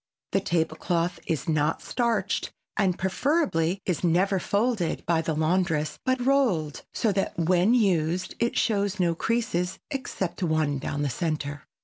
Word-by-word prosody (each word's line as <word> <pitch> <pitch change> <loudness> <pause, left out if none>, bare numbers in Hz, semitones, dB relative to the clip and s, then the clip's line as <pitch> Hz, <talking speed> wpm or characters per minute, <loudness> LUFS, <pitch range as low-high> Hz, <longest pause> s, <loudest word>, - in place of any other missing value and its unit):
The - - +3
table 160 -2 0
cloth 170 0 -1
is 160 - -1
not 155 -2 +1
starched 230 -5 0 0.2
and 190 -4 +1
preferably 190 - +1
is 180 -2 -1
never 185 +3 +3
folded 205 -1 0
by 165 -1 +2
the 160 -1 -2
laundress 155 -2 0
but 260 -1 0
rolled 205 - +2
so 225 - +1
that 195 -1 -1
when 180 +6 +3
used 185 -5 +1
it 235 0 0
shows 205 -2 +1
no 175 -2 +3
creases 190 -2 -1
except 235 - -3
one 155 -5 +1
down 145 +1 -3
the 145 - 0
center. 145 +1 -3
180 Hz, 145 wpm, -26 LUFS, 160-205 Hz, 0.2 s, The